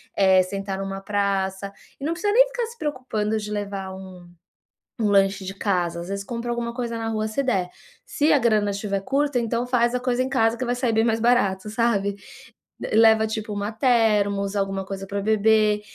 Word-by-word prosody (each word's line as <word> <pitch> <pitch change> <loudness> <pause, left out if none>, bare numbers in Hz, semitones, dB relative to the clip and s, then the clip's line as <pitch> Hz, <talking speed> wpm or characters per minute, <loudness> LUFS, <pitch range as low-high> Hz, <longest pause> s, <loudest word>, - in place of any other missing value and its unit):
eh, 190 -1 +5
sentar 195 +1 -4
numa 195 0 -4
praça. 195 -1 -1 0.3
E - - -10
não 315 - 0
precisa 410 +5 -1
nem - - +6
ficar - - -3
se 470 +1 -12
preocupando 255 - -2
de 210 -1 -5
levar 200 -2 -4
um 185 -2 -11 0.7
um 215 -2 +1
lanche 195 0 +3
de 190 - -5
casa, 180 -4 -1
às 170 - -8
vezes 200 0 -3
compra 235 +1 -5
alguma 235 0 -3
coisa 235 -2 -4
na 225 0 -3
rua 215 -1 -1
se 220 +6 -2
der, 195 -9 0 0.4
se 295 +1 +1
a 285 - +4
grana 215 -4 +2
tiver 200 0 -3
curta, 275 +4 0
então 235 +1 -1
faz 240 -1 +2
a - - 0
coisa 250 0 0
em 260 - -3
casa 230 -3 +2
que 255 - -3
vai 245 - 0
sair 245 -2 0
bem 220 0 +3
mais 225 -1 +1
barato, 215 -5 +1
sabe. 210 -3 0 0.8
Leva 220 0 +5
tipo 220 0 -4
uma 205 +2 -3
thermos, 210 -5 +2
alguma 195 -1 -1
coisa 195 0 -6
pra 200 +1 -3
beber 215 0 +3
215 Hz, 200 wpm, -23 LUFS, 195-240 Hz, 0.8 s, nem